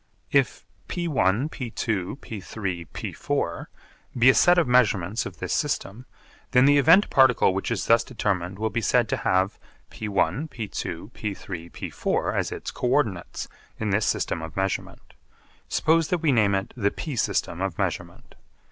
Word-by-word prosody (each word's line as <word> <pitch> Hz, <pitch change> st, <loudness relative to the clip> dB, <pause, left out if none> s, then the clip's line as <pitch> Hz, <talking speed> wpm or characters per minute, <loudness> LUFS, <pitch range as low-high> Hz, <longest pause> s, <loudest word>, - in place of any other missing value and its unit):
If -, -, +1 dB, 0.2 s
(p₁, 175 Hz, -1 st, -2 dB, 0.4 s
p₂, 110 Hz, -5 st, -3 dB
p₃, 95 Hz, -, -5 dB
p₄) 140 Hz, -13 st, -3 dB, 0.5 s
be 120 Hz, +2 st, +6 dB
a -, -, -1 dB
set 175 Hz, 0 st, +5 dB
of 170 Hz, -, +3 dB
measurements 110 Hz, -5 st, +2 dB
of -, -, -11 dB
this -, -, -3 dB
system, 115 Hz, +6 st, -2 dB, 0.4 s
then 125 Hz, 0 st, +5 dB
the 145 Hz, 0 st, +6 dB
event 165 Hz, +8 st, +5 dB
particle 130 Hz, -7 st, +5 dB
which 95 Hz, -, -2 dB
is 115 Hz, -4 st, -1 dB
thus 115 Hz, 0 st, +4 dB
determined 95 Hz, -7 st, -2 dB
will 110 Hz, +1 st, -1 dB
be 120 Hz, -, -1 dB
said 120 Hz, +1 st, +2 dB
to -, -, 0 dB
have 95 Hz, +2 st, +1 dB, 0.3 s
p₁, 110 Hz, +8 st, -1 dB
p₂, 105 Hz, -, -5 dB
p₃, 95 Hz, -6 st, -6 dB
p₄ -, -, -2 dB
as -, -, -1 dB
its -, -, -5 dB
co 125 Hz, -, -3 dB
ordinates 110 Hz, -10 st, 0 dB, 0.3 s
in 110 Hz, -2 st, -1 dB
this 105 Hz, +2 st, +1 dB
system 80 Hz, -, -1 dB
of 80 Hz, +1 st, -8 dB
measurement. 95 Hz, 0 st, -3 dB, 0.6 s
Suppose 160 Hz, 0 st, +2 dB
that 180 Hz, -, +1 dB
we 155 Hz, -, +4 dB
name 105 Hz, -5 st, +3 dB
it 95 Hz, 0 st, -3 dB
the 105 Hz, -5 st, +1 dB
p 145 Hz, +6 st, -5 dB
system 90 Hz, -5 st, -1 dB
of 95 Hz, -4 st, -2 dB
measurement. -, -, -4 dB
110 Hz, 155 wpm, -25 LUFS, 95-130 Hz, 0.6 s, be